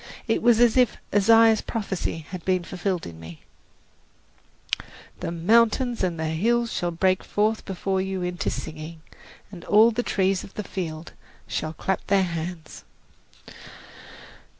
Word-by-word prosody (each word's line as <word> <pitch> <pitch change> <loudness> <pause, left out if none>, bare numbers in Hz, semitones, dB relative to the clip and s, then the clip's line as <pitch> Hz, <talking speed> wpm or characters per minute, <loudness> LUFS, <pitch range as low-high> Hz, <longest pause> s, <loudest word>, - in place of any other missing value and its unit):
It 225 - +1
was 235 -1 +4
as 240 0 +4
if 250 -2 +3 0.2
Isaiah's 225 +2 +5
prophecy 190 -7 -4
had 185 -2 -6
been 185 -1 +1
fulfilled 185 0 -3
in 80 -1 -9
me, 80 0 -11 1.8
"The - - -3
mountains 230 +7 +2
and 175 -3 -1
the 160 - -1
hills 230 +9 +1
shall 175 - -1
break 185 +2 +1
forth 215 +1 0
before 190 0 -1
you 190 -1 -3
into 180 0 -2
singing, 155 +1 -7 0.5
and 180 -4 -10
all 220 +3 +6
the 235 +2 -1
trees 190 -4 0
of 195 - -13
the 210 - -3
field 165 -4 -6 0.3
shall 155 0 -3
clap 190 +3 -3
their 195 -1 +3
hands!" 170 -2 -5
190 Hz, 140 wpm, -25 LUFS, 170-220 Hz, 1.8 s, all